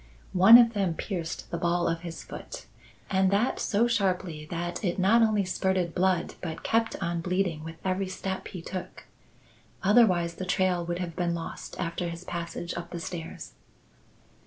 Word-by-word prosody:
One 195 +6 +10
of 235 -1 +5
them 195 -5 0
pierced 170 -4 -5
the 170 - -2
ball 175 0 +1
of 165 0 0
his 170 -1 -7
foot, - - -9 0.4
and 190 0 +2
that 205 +6 +1
so 220 +3 +2
sharply 185 -8 -1
that 175 +5 -4
it 175 -3 0
not 200 +5 +4
only 215 -3 +3
spurted 185 -2 0
blood 185 -1 +1
but 165 -3 -5
kept 225 0 +1
on 170 0 -1
bleeding 180 -3 -1
with 165 0 -7
every 190 +1 0
step 190 0 -4
he 180 -3 -8
took. 185 +1 -7 0.8
Otherwise, 190 -5 +4
the 185 - -4
trail 180 -1 +1
would 175 0 -3
have 175 -3 -4
been 175 -2 0
lost 165 -1 -7
after 170 0 -2
his 170 +1 -7
passage 170 -1 -5
up 170 0 -6
the 175 - -5
stairs." 165 -1 -7
180 Hz, 170 wpm, -28 LUFS, 170-190 Hz, 0.8 s, One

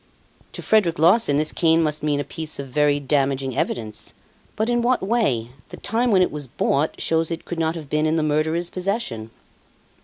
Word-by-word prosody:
"To - - -6
Frederic 200 -7 +3
Larsan 165 -1 +4
this 155 +1 +1
cane 165 -1 +3
must 150 -1 -1
mean 150 -1 0
a - - -1
piece 155 +2 -5
of 140 - -6
very 145 +2 +2
damaging 135 -2 0
evidence. 110 -3 -3 0.4
But 220 +1 0
in 240 0 +1
what 245 -1 +1
way? 190 - +1 0.2
The - - -9
time 235 +3 0
when 190 -4 +5
it - - -1
was 145 -2 -5
bought 140 +5 0
shows 165 0 0
it 165 -1 -5
could 175 - -5
not 160 0 0
have 155 -3 -7
been 150 +2 +1
in 155 - +1
the 160 - +1
murderer's 160 +3 0
possession." 185 - -3
155 Hz, 195 wpm, -22 LUFS, 145-180 Hz, 0.4 s, when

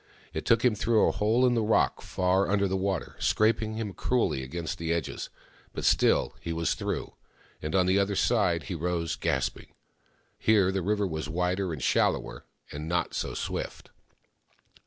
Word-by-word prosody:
It - - -4
took 115 +1 +4
him 125 - +5
through 110 +1 +2
a - - +3
hole 115 +5 +2
in 125 - +3
the 115 - +2
rock, 110 0 +2
far 95 +1 +1
under 100 0 +2
the 95 - -1
water, 95 0 -2
scraping 110 0 +1
him 110 -3 -4
cruelly 90 - 0
against 80 +5 -5
the 85 0 -2
edges; 85 -3 -3 0.4
but - - -4
still, - - +3
he 85 - -4
was 85 0 0
through, - - -4 0.5
and 75 +3 -3
on 90 -1 +4
the 95 +2 +3
other 100 0 0
side 95 -7 +2
he - - -5
rose, 85 0 -2
gasping. 65 - -2 0.6
Here 100 -4 +4
the 95 0 -1
river 105 +3 0
was 80 -4 -4
wider 90 +2 -1
and 75 -6 -5
shallower, - - 0 0.3
and 75 +2 -6
not 85 - 0
so - - -3
swift. - - -5
95 Hz, 175 wpm, -28 LUFS, 85-105 Hz, 0.6 s, him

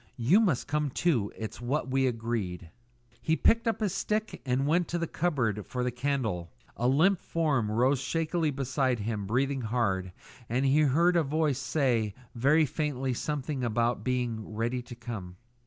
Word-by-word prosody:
You 130 - +4
must 180 - +1
come 150 0 0
too. 130 - +1
It's 110 +1 -6
what 130 +2 -1
we 135 0 +3
agreed." 110 -8 -3 0.5
He 160 - +2
picked 230 +7 +3
up 225 - 0
his 205 -4 0
stick 215 +2 -2
and 130 +2 +1
went 170 +4 +2
to 175 - -2
the 170 - -1
cupboard 125 - -1
for 125 -1 -2
the 125 - 0
candle. 120 -9 -2 0.3
A 120 - 0
limp 165 +8 +3
form 145 -10 0
rose 125 +5 +2
shakily 165 +3 0
beside 130 -2 0
him 105 -2 -3
breathing 135 +4 0
hard, 100 -6 -1 0.4
and 125 +4 +1
he 135 +3 +4
heard 160 +5 +4
a 170 - +5
voice 150 -2 0
say 120 -5 0 0.2
very 145 +7 +4
faintly 135 -3 -2
something 145 0 -3
about 120 +1 0
being 120 -4 -2
"ready 120 +3 -1
to 120 0 -10
come." 110 -7 -7
130 Hz, 170 wpm, -29 LUFS, 115-150 Hz, 0.5 s, a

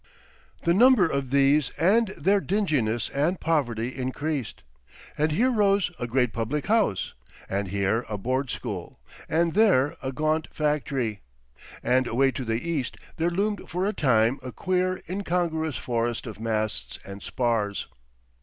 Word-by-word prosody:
The 170 - +3
number 235 -2 +6
of 140 -4 -2
these 140 +1 +4
and 215 +7 +4
their 195 +6 +3
dinginess 145 - 0
and 155 +6 0
poverty 125 -7 0
increased, 135 +1 -3 0.5
and 155 +1 +1
here 245 +12 +3
rose 200 -4 +2
a 120 - -2
great 125 -1 +1
public 120 +6 -2
house 215 - +1 0.3
and 100 +1 -2
here 100 +4 0
a 105 - -2
Board 130 +6 -1
School 105 -9 -5 0.3
and 165 0 +2
there 185 -10 +4
a 130 - -3
gaunt 155 +3 0
factory; 140 -7 -1 0.6
and 130 0 +2
away 135 +3 +2
to 130 - -4
the 115 +5 -2
east 145 -8 -2 0.2
there 165 +1 +1
loomed 200 +3 -2
for 180 +3 -1
a 210 - 0
time 120 - +2
a 130 0 -6
queer, 185 - -1
incongruous 170 - -1
forest 115 +1 -2
of 110 -3 -8
masts 110 - -2
and 100 +1 -8
spars. 115 -5 -1
140 Hz, 145 wpm, -26 LUFS, 115-170 Hz, 0.6 s, number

